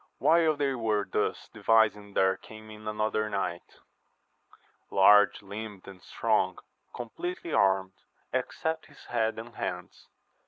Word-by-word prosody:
HILE 160 +1 +4
they 140 -2 +1
were 110 -4 0
thus - - -2
devising 105 -3 +2
there 95 0 +3
came 110 +2 -13
in 110 0 -11
another 110 0 -1
knight, 90 -4 -4 1.1
large 105 +1 +5
limbed 100 0 -8
and 95 -2 -11
strong, - - 0 0.3
compleatly 165 +8 -5
armed, 95 -2 +2 0.3
except 160 0 -2
his - - -17
head 110 -2 0
and 115 +1 -8
hands. - - -5
110 Hz, 120 wpm, -29 LUFS, 100-115 Hz, 1.1 s, large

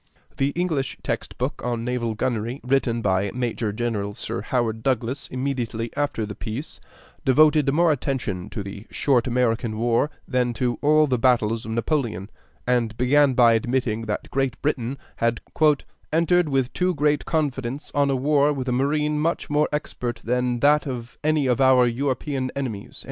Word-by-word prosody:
The 135 - +2
English 165 -6 -1
text - - -3
book - - -2
on 120 -1 -2
Naval 120 -2 -1
Gunnery, 120 +2 -2
written 125 -3 +1
by 95 0 +1
Major 120 -3 -1
General 105 -2 -2
Sir - - -4
Howard 115 -1 -1
Douglas 130 +2 -1
immediately 125 -4 -3
after 145 -6 -1
the 105 - -6
peace, 115 +7 -6 0.4
devoted 150 +1 +4
more 165 +3 +4
attention 125 -10 -2
to 105 - -5
the 100 +2 -9
short 130 -5 +1
American 120 -2 0
war 120 +5 +2 0.2
than 125 -2 +1
to 120 +1 -1
all 155 +1 +5
the 130 -4 0
battles 115 -3 +2
of - - -4
Napoleon, 115 - -1 0.3
and 120 -3 0
began 135 +2 +4
by 120 -2 +6
admitting 115 -1 0
that 105 - -4
Great 135 -3 -1
Britain 135 -3 -1 0.2
had 115 0 +1 0.7
"entered 170 +1 +3
with 135 -2 0
too 180 -1 +1
great 150 0 +1
confidence 140 -4 -2
on 140 -2 +1
war 145 0 +4
with 135 -3 -3
a - - +1
marine 150 +4 +1
much 165 -1 -1
more 150 +1 +2
expert 125 -5 -3
than 125 0 0
that 150 +1 +4
of 120 -3 -6
any 155 -2 +2
of 125 0 +1
our 130 -1 +6
European 130 +2 -1
enemies." 120 -8 -5
125 Hz, 160 wpm, -24 LUFS, 115-145 Hz, 0.7 s, by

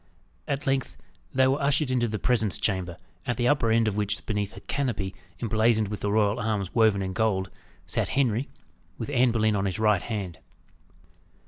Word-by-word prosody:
At 140 0 -2
length, 135 -2 -1 0.3
they 130 0 +3
were 135 +2 +1
ushered 140 0 +2
into 120 -2 +2
the 110 -1 -2
presence 110 -4 +1
chamber, 95 -5 -2 0.3
at 125 -2 0
the 120 - +1
upper 140 -5 +3
end 115 0 +3
of 105 -1 -1
which 105 -1 -1
beneath 105 -2 -2
a - - -9
canopy 115 -9 -2 0.3
emblazoned 110 -2 +2
with 105 - -4
the 100 - -1
royal 105 +1 +2
arms 105 -5 -2
woven 110 -4 +3
in 95 0 -3
gold, 95 -2 0 0.3
sat - - -1
Henry, 125 -1 +1 0.5
with - - -5
Anne 125 -2 +4
Boleyn 110 -2 +2
on 100 0 0
his 95 0 -1
right 105 -3 +3
hand. 100 -7 -4
110 Hz, 185 wpm, -27 LUFS, 100-125 Hz, 0.5 s, Anne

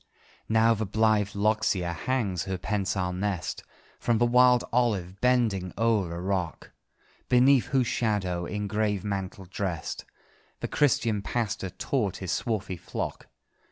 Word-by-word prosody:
Now 110 +1 +4
the 110 -1 -2
blithe 105 -1 +2
loxia 100 -4 +1
hangs 100 -1 -1
her 95 -1 -2
pensile 95 -2 -1
nest 95 -1 -3 0.4
From 120 -1 +1
the 120 - +3
wild 125 0 +5
olive, 100 -7 0
bending 115 -8 +2
o'er 110 -6 +2
the 85 +1 -5
rock, 90 -2 -3 0.6
Beneath 130 +1 +5
whose 130 -3 +2
shadow, 95 -7 -1
in 105 0 -3
grave 105 -2 0
mantle 95 -2 -4
drest, 90 -3 -4 0.5
The - - -3
Christian 115 -7 +2
pastor 105 -3 -2
taught 105 0 -2
his 95 -2 -4
swarthy 105 -3 -2
flock. - - -5
105 Hz, 130 wpm, -27 LUFS, 95-115 Hz, 0.6 s, wild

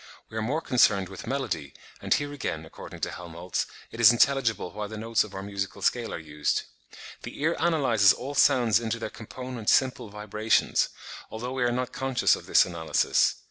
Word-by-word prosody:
We 110 - -6
are - - -2
more 140 +9 -1
concerned 105 - +3
with 95 - -9
melody, 120 - -3 0.3
and - - -7
here 145 0 +2
again, 80 - -4
according 80 - -11
to - - -1
Helmholtz, 90 0 -4 0.2
it 115 - -10
is 115 -1 +9
intelligible 120 -6 +2
why 105 0 -4
the 110 +1 -8
notes 115 +1 +1
of 105 -2 -11
our 95 - -5
musical 100 -1 -5
scale 120 -2 +1
are - - -4
used. 75 -2 -2 0.6
The - - -9
ear 165 +2 +2
analyses 130 - +4
all 135 +3 -4
sounds 120 -5 +4
into 115 0 -2
their 110 -1 -5
component 120 +1 -6
"simple 130 -4 +2
vibrations," 105 +1 +1 0.4
although 120 +3 -5
we 130 -1 -1
are 120 - +2
not 125 +1 -2
conscious 130 -1 +2
of - - -11
this - - +5
analysis. 85 -3 +1
110 Hz, 185 wpm, -27 LUFS, 100-125 Hz, 0.6 s, is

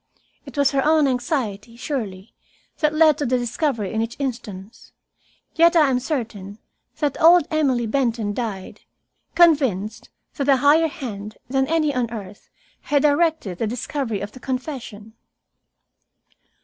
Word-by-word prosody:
It - - -11
was 280 -1 +3
her 275 -1 +1
own 310 -1 +4
anxiety, 245 -4 -2
surely, 225 -7 -5 0.5
that 300 -2 +2
led 310 -2 +5
to 290 - -1
the 255 +1 +2
discovery 240 - -2
in 220 - 0
each 230 +1 -4
instance, 225 -6 -6 0.6
yet 335 +1 +4
I 300 -5 +5
am 250 - +1
certain 225 - -5 0.4
that 295 +1 -2
old 335 0 +7
Emily 270 -6 +1
Benton 230 -3 -1
died, 210 -5 -5 0.5
convinced 250 - +2 0.3
that 280 -1 -1
a 270 - +6
higher 295 +5 +4
hand 215 -8 -7
than 265 +1 0
any 310 -2 +1
on 250 -3 -1
earth 205 -3 -9 0.3
had 285 -1 +1
directed 300 - +1
the 225 - 0
discovery 240 -1 -3
of 205 +1 -5
the 255 - -13
confession. 250 -5 -6
255 Hz, 140 wpm, -22 LUFS, 220-295 Hz, 0.6 s, old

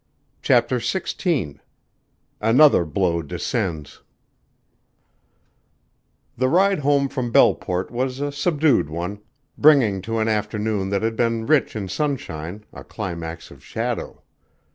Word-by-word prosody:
CHAPTER 125 0 +2
XVI 135 - -2 0.8
ANOTHER 115 - +5
BLOW 85 +1 0
DESCENDS 75 0 -4 2.3
The 130 +2 +1
ride 190 +5 +3
home 140 -1 +2
from 125 -3 -4
Belleport 90 -4 +2
was 130 +2 -2
a 145 0 -2
subdued 145 - +1
one, 90 +6 -5 0.4
bringing 130 -11 +5
to 115 +4 -3
an 110 0 0
afternoon 105 -2 -1
that 100 +1 -1
had 115 0 -1
been 115 -1 0
rich 150 -3 +2
in 100 -3 -4
sunshine 100 - -4
a - - -10
climax 85 -5 -6
of - - -15
shadow. - - -4
115 Hz, 115 wpm, -22 LUFS, 95-140 Hz, 2.3 s, ANOTHER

